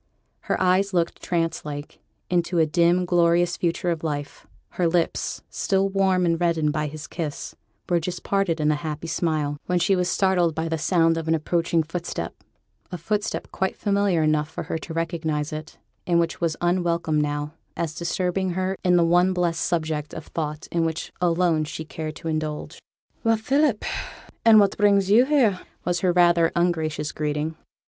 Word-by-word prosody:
Her - - -2
eyes 190 +1 +2
looked, 170 -1 0
trance 165 -2 -1
like, 145 -1 -7 0.3
into 175 0 0
a 160 - +5
dim, 170 +4 +3
glorious 175 0 +3
future 175 +1 -1
of 165 -1 -3
life; 145 -2 -4 0.2
her 175 - 0
lips, 170 0 -1
still 195 0 +1
warm 190 -2 +2
and 165 0 +1
reddened 160 -3 +1
by 150 0 -1
his 150 +1 -7
kiss, 160 -4 -5 0.3
were 175 -1 +2
just 175 +1 -5
parted 195 -5 0
in 150 0 +2
a - - +1
happy 155 0 -4
smile, 155 -3 -1
when 180 - +1
she 190 +3 +3
was 180 -1 0
startled 180 -4 +2
by 160 +1 -2
the 160 -1 -2
sound 165 0 +2
of 165 - -6
an 165 - +3
approaching 165 +1 +1
footstep 170 +2 -4 0.6
a 180 - -4
footstep 205 +5 -2
quite 190 0 -1
familiar 200 -5 +1
enough 155 0 +1
for 160 - -5
her 160 - -3
to 165 - -9
recognize 160 -2 -2
it, 155 +1 -7 0.3
and 170 -1 +3
which 170 +1 -1
was 165 -2 0
unwelcome 170 -3 +1
now, 145 +1 -2 0.2
as 165 -2 -2
disturbing 180 +2 -1
her 185 +1 -1
in 180 -1 +4
the 170 -1 +4
one 175 +2 +4
blessed 175 -2 0
subject 155 -3 -1
of - - -7
thought 150 -1 -4
in 170 -1 +1
which 160 0 -3
alone 170 -2 +2
she 160 +1 -6
cared 155 0 -6
to 165 - -8
indulge. 155 -1 -3 0.4
'Well, 225 -1 +3
Philip! 270 0 +1 0.6
an' 225 -1 +7
what 200 -2 +4
brings 200 -2 +3
yo' 235 +4 +6
here?' 255 -10 +3 0.3
was 175 -1 0
her 180 0 +2
rather 175 -1 +4
ungracious 160 -3 0
greeting. 150 +1 -2
170 Hz, 180 wpm, -24 LUFS, 155-180 Hz, 0.6 s, an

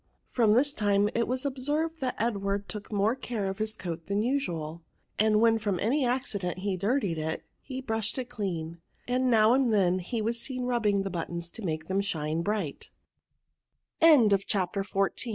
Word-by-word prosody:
From 225 -4 +4
this 280 +5 +3
time 205 -2 +2
it 235 0 +1
was 255 +2 -2
obsenred 295 +5 -1
that 260 -2 -2
Ed 225 -1 +1
ward 200 0 -2
took 210 0 -7
more 210 +2 +2
care 240 -6 -3
of 190 +1 -4
his 215 0 -2
coat 165 -2 -5
than 200 +1 0
usual; 170 - -2 0.4
«nd 215 -1 +3
when 225 -1 +4
from 205 -4 -1
any 270 +7 +1
accident 230 -8 -1
he 195 +1 -1
dirtied 200 - 0
it, 160 +1 -3 0.2
he 260 -1 -6
brushed 225 -2 -2
it 255 -2 -3
clean^ 170 -7 -4 0.3
and 255 +1 +1
now 220 -1 +5
and 260 -2 +3
then 185 -3 +3
he 205 +6 -3
was 230 +2 -1
seen 255 -1 -4
rubbing 220 -5 +1
the 195 - -4
buttons 170 0 -4
to - - -8
make 155 -4 -3
them 190 +1 +1
shine 160 -4 -1
210 Hz, 170 wpm, -28 LUFS, 185-245 Hz, 0.4 s, now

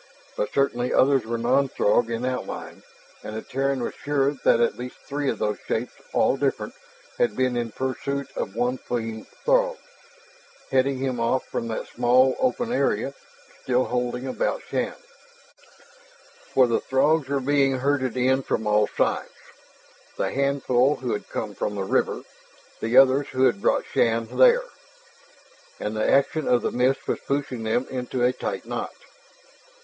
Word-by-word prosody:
But 105 - -2
certainly 125 -3 +1
others 135 -3 +3
were 115 0 -1
non 130 +4 +2
Throg 115 +1 +2
in 115 +1 -2
outline. 130 0 -5 0.4
And 110 - -6
the 110 - -5
Terran 135 -1 -1
was - - -3
sure 140 -1 0
that 115 - +4
at 120 - +2
least 125 +1 -7
three 145 -1 -2
of 115 - -1
those 105 -1 -1
shapes, 120 +3 -2 0.2
all - - +2
different, - - -1 0.5
had - - +2
been 130 -1 +1
in 120 -1 -2
pursuit 130 +3 -3
of 95 - -4
one 125 +2 0
fleeing 115 -2 -4 0.2
Throg, - - +3 0.9
heading 135 +1 +2
him 130 -2 -2
off 115 +3 +1
from 115 - -4
that 110 - -3
small 125 +2 +3
open 245 -2 0
area - - 0 0.5
still 125 0 +2
holding 125 +1 -2
about 135 - -2
Shann. - - -1 1.6
For 130 - +5
the 115 -1 0
Throgs 145 +2 +2
were 140 0 0
being 135 0 +2
herded 130 -2 0
in 130 +2 +3
from 110 -4 -2
all 105 0 +3
sides - - -1 0.9
the - - -1
handful 140 0 +2
who 125 -2 -3
had 105 - -5
come 105 -2 -4
from 105 - -3
the 100 - -2
river, 95 - 0 0.6
the 115 +2 +1
others 135 +1 +6
who 130 0 0
had 120 -6 +3
brought - - +2
Shann 115 0 0
there. - - +6 1.2
And 105 +1 -3
the 110 - +1
action 145 +2 +2
of 120 -1 +3
the - - 0
mist 125 +2 +1
was - - -1
pushing 140 -4 -3
them 110 +3 0
into 125 -1 -2
a 125 +1 +3
tight - - -4
knot. - - -4
130 Hz, 160 wpm, -24 LUFS, 120-140 Hz, 1.6 s, others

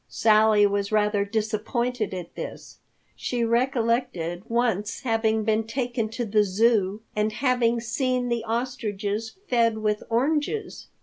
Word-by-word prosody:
Sally 215 -1 +4
was 200 0 0
rather 210 -1 +2
disappointed 220 +2 -1
at 180 -3 -6
this. - - -8 0.4
She 240 -1 -2
recollected 235 - 0
once 225 -3 0
having 225 -3 +1
been 220 0 +1
taken 240 -3 -2
to 235 +2 -3
the 210 0 +3
Zoo 210 0 +1
and 210 +1 +1
having 240 -1 +1
seen 250 +2 -1
the 235 -2 -1
ostriches 225 -3 -3
fed 230 -2 +2
with 210 -1 0
oranges. 295 - -1
225 Hz, 125 wpm, -25 LUFS, 210-240 Hz, 0.4 s, Sally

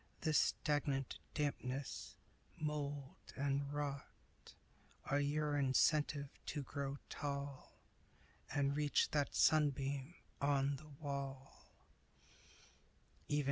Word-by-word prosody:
This 155 -2 +4
stagnant 140 -3 +1 0.2
dampness, 140 -2 -2 0.4
mold 145 -2 -3 0.2
and 140 0 0
rot 145 -2 -1 1.0
Are 145 - +2
your 145 +1 +1
incentive 145 +1 +3 0.2
to 145 -2 -2
grow 140 +1 -3
tall 140 -1 -4 0.7
And 140 -1 +2
reach 150 -1 +3
that 145 -2 +1
sunbeam 140 0 +3 0.3
on 140 0 +3
the 150 +3 -13
wall." 140 -2 -6
140 Hz, 85 wpm, -39 LUFS, 140-145 Hz, 1.0 s, This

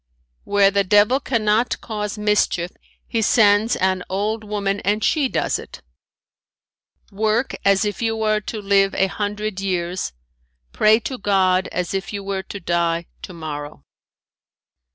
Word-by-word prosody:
"Where 200 -1 +4
the 200 0 +2
devil 210 +7 +4
cannot 230 -3 +1
cause 210 -1 -4
mischief 210 -4 +1 0.4
he 225 - -1
sends 215 +1 +4
an 185 0 0
old 210 +3 -2
woman 205 -1 -2
and 210 +2 0
she 285 -1 +2
does - - -1
it. - - -11 1.3
"Work 220 +5 0
as 200 +1 +3
if 205 +2 -3
you 225 -1 -1
are 215 0 +2
to 215 +1 -5
live 195 -1 +2
a 195 - +3
hundred 205 +1 -3
years, 180 -1 -2 0.6
pray 215 +1 +4
to 255 +2 -5
God 190 -2 +2
as 180 0 -3
if 195 0 -3
you 200 -1 -4
were 195 -1 -3
to 200 +1 -8
die 170 -1 0 0.2
tomorrow." 155 -4 -7
205 Hz, 140 wpm, -21 LUFS, 190-215 Hz, 1.3 s, Where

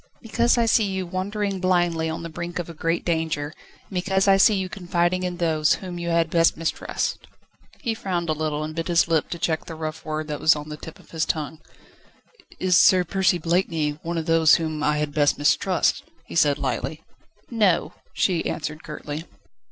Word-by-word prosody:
"Because 235 +1 +1
I 235 - +3
see 225 -1 +3
you 190 -1 -2
wandering 195 +2 -2
blindly 175 -3 +1
on 160 +1 -4
the 165 - -5
brink 170 +2 -6
of 175 - -3
a 170 - -8
great 165 +2 -1
danger, 160 -3 -1 0.3
and - - -30
because 190 +1 +1
I 195 - +7
see 200 +2 +5
you 190 -1 -1
confiding 180 -1 0
in 180 -1 -3
those, 160 -3 +2
whom 180 -2 -7
you 170 0 -3
had 165 -1 +1
best 165 -1 +3
mistrust." 165 0 -3 0.5
He 235 -5 -1
frowned 180 -5 -3
a 155 - +1
little, 155 -1 -2
and 155 +1 -5
bit 165 0 -3
his 175 -1 +3
lip 160 -2 +1
to 170 - -4
check 160 -1 -1
the 165 - -7
rough 155 0 -5
word 155 0 -3
that 150 - -3
was 155 - +5
on 150 0 -7
the 150 - -5
tip 160 - -10
of - - -20
his 160 -1 -1
tongue. 155 -1 -3 1.0
"Is 185 -1 +2
Sir 185 -1 +6
Percy 185 0 +1
Blakeney 165 -3 0
one 170 +1 -3
of 160 - -2
those 165 -1 +5
whom 155 -2 -2
I 150 0 +1
had 150 -1 -2
best 145 -1 +3
mistrust?" 165 +5 +2 0.2
he - - -11
said 145 -4 +3
lightly. 135 +2 -3 0.5
"No," 210 -7 +2 0.2
she 175 -4 +1
answered 155 0 -4
curtly. 150 +1 -6
165 Hz, 200 wpm, -24 LUFS, 155-185 Hz, 1.0 s, I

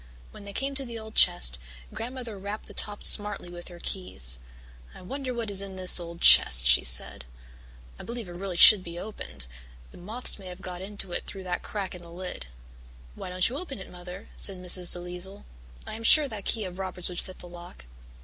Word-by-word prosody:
When 205 - -13
they 200 - -9
came 275 +6 -3
to 275 0 -2
the 235 -3 -8
old 220 -1 -11
chest, 175 - +5 0.3
Grandmother 240 -1 -7
rapped 205 +2 -7
the - - -12
top 205 -1 -2
smartly 205 -4 +3
with 175 0 -11
her 175 -1 -12
keys. 65 - 0 0.6
"I - - -13
wonder 265 +6 -6
what 230 -4 -5
is 195 -1 +2
in 195 -1 -8
this 185 -1 +5
old 170 0 -10
chest," 60 0 +8
she 60 - +4
said. - - 0 0.8
"I - - -9
believe 235 -3 -7
it - - -10
really 180 0 -7
should 200 +1 +8
be 170 -1 -9
opened. 125 - -5 0.5
The - - -15
moths 215 +6 -3
may 190 - -11
have 180 -1 -10
got 180 -1 -7
into 195 -1 -3
it - - -5
through 195 -1 -8
that 180 -1 -4
crack 200 -3 -6
in 180 - -10
the 170 - -14
lid." 175 - -8 0.7
"Why - - -9
don't 180 0 +3
you 255 - -3
open 345 -7 -8
it, 190 - -10
Mother?" 180 +2 -11
said 195 -2 +2
Mrs. 180 0 +4
DeLisle. 180 +2 -2 0.4
"I - - -9
am 225 +1 -9
sure 295 +5 +6
that 210 -6 -9
key 220 - 0
of 185 -1 -8
Robert's 185 -2 -3
would 180 -1 -6
fit 185 - -9
the 180 - -10
lock." 175 - -13
185 Hz, 215 wpm, -26 LUFS, 175-215 Hz, 0.8 s, chest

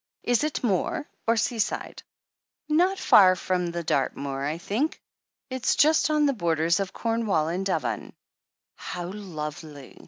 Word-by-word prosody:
Is 245 0 +2
it 305 -3 -2
moor, 240 - 0 0.2
or 230 0 +3
seaside 220 0 -2 0.4
?" - - -66
'Not 355 +5 +2
far 185 - +6
from 180 -1 -1
Dartmoor, 140 -4 -2
I 150 +3 -2
think. 225 - -2 0.5
It's 260 -2 0
just 310 +1 +4
on 300 -1 +3
the 280 - +2
borders 170 -3 +1
of 195 -2 -2
Cornwall 225 -9 0
and 180 +3 -2
Devon." 160 -10 -2 0.7
"How 175 0 -6
lovely 155 -7 -8
190 Hz, 135 wpm, -26 LUFS, 165-245 Hz, 0.7 s, far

